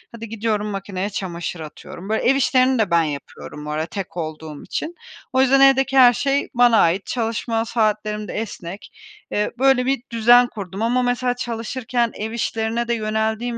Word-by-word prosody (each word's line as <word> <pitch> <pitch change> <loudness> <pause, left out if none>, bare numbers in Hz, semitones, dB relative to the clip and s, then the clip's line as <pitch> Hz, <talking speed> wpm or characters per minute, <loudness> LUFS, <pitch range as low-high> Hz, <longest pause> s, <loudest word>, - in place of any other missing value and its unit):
hadi 230 -1 -8
gidiyorum 215 -1 -1
makineye 195 -1 -4
çamaşır 175 -3 -5
atıyorum. 170 +5 -9
Böyle, 220 - 0
ev 265 - +4
işlerini 255 -1 +3
de 205 -5 +1
ben 170 -1 +4
yapıyorum 150 0 -7
bu 150 - -4
arada 155 +1 -1
tek 180 -1 -7
olduğum 155 -2 -6
için. 335 +3 -4 0.4
O 260 - +4
yüzden 270 +1 +4
evdeki 270 0 +4
her 245 -2 +8
şey 275 +4 0
bana 240 -2 +5
ait. 175 +4 +2
Çalışma 225 -1 -2
saatlerim 215 -2 -1
de - - -6
esnek. 200 -3 -6 0.4
Eee, 210 - 0
böyle 265 -2 +4
bir 265 -2 0
düzen 240 +2 +5
kurdum 200 -3 -7
ama 245 +2 +2
mesela 245 0 0
çalışırken 235 0 -2
ev 220 +1 -4
işlerine 230 0 -2
de 235 - +1
yöneldiğim 220 +2 -1
225 Hz, 170 wpm, -21 LUFS, 195-245 Hz, 0.4 s, her